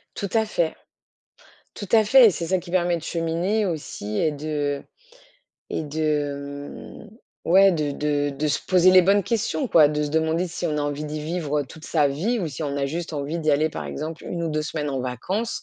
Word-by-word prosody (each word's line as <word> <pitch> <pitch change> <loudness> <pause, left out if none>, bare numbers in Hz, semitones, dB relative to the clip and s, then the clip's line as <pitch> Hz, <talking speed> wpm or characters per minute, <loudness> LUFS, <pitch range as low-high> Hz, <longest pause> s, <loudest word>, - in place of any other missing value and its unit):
Tout 200 - -4
à 220 -1 +3
fait, 170 -6 -1 1.0
tout 200 - -7
à 220 -1 +6
fait. 255 +3 +7
Et - - +6
c'est 170 -2 -4
ça 190 - +2
qui 175 0 -10
permet 175 -1 +2
de 165 - -7
cheminer 170 +6 -1
aussi 110 - -4
et 160 - +2
de 145 -1 -2 0.9
et - - -1
de, 145 -2 -2
mmh, 215 -5 -11
ouais 195 +2 +7
de 150 -4 -1
de 145 0 0
de 150 +2 -2
se 145 - +1
poser 185 0 +5
les 185 0 +7
bonnes 200 +3 +3
questions 235 +5 -1
quoi, 155 -7 +6
de 150 0 -1
se 150 - -1
demander 160 +3 0
si 175 +1 -4
on 155 -2 -1
a - - 0
envie 145 +1 -3
d'y 150 0 -4
vivre, 150 -2 -1
heu, - - -3
toute 160 +4 -13
sa 150 -3 +2
vie 190 - -1
ou 170 - -2
si 145 +3 -6
on 140 -1 -2
a 140 -1 0
juste 165 +3 -4
envie 145 +3 -3
d'y 155 -2 +1
aller, 150 +2 +3
par - - -6
exemple, 160 +2 -6
1 170 - -4
ou 165 - -1
2 155 0 -1
semaines 150 -1 -3
en 135 -1 -2
vacances, 180 - -3
160 Hz, 225 wpm, -24 LUFS, 145-180 Hz, 1.0 s, fait